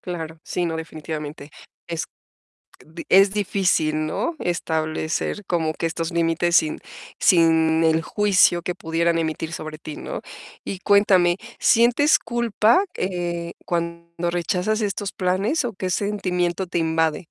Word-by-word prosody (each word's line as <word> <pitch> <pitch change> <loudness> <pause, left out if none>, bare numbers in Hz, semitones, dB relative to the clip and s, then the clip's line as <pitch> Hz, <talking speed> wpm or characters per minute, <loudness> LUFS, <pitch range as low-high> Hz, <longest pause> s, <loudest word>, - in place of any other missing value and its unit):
Claro. 165 -3 -6
Sí, 180 - -2
no, 165 -1 -2
definitivamente. 155 -2 -7 0.4
Es 170 -2 -3 0.8
d 160 +2 -10
es 195 +1 +6
difícil, 180 -6 +1
¿no? 330 - -2
Establecer 160 +3 -2
como 160 -3 0
que 165 - -4
estos 165 +1 -2
límites 170 0 +1
sin 155 -2 +2 0.4
sin 160 -2 +4
el 160 0 +3
juicio 185 -2 +3
que 180 - -2
pudieran 165 0 0
emitir 160 0 -3
sobre 155 0 -6
ti, 155 -1 -8
¿no? - - -6 0.4
Y 195 - -5
cuéntame, 190 -3 +4 0.2
¿sientes 245 +6 +4
culpa, 235 - +2
eh, 175 -2 -3
cuando 170 0 -3
rechazas 180 +5 -1
estos 200 -1 -2
planes 190 - 0
o 235 - -3
qué 185 -1 -4
sentimiento 185 -2 -1
te 175 - -1
invade? 160 -1 +1
170 Hz, 130 wpm, -22 LUFS, 160-190 Hz, 0.8 s, es